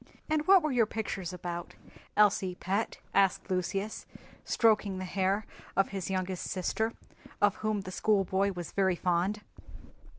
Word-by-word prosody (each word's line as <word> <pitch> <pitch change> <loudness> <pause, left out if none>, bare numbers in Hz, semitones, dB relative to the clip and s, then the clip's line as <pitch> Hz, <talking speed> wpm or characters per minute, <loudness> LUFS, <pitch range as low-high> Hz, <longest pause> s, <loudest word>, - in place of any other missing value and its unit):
"And 310 -1 +1
what 385 -3 +7
were 305 - 0
your 235 -4 +3
pictures 195 -5 -3
about, 175 -1 -6 0.4
Elsie, 195 -3 +4
pet?" 195 +5 -2 0.2
asked 195 0 +2
Lucius, 195 +3 -2 0.4
stroking 210 -4 +2
the 185 - -4
hair 195 +3 0 0.3
of 195 - +3
his 195 -2 -4
youngest 185 -1 -2
sister, 220 +5 -1 0.5
of 205 -1 +3
whom 215 -1 -1
the 185 -1 -7
schoolboy 195 -1 +2
was 175 -3 -6
very 190 -2 +2
fond. 185 +4 0
195 Hz, 140 wpm, -30 LUFS, 185-210 Hz, 0.5 s, what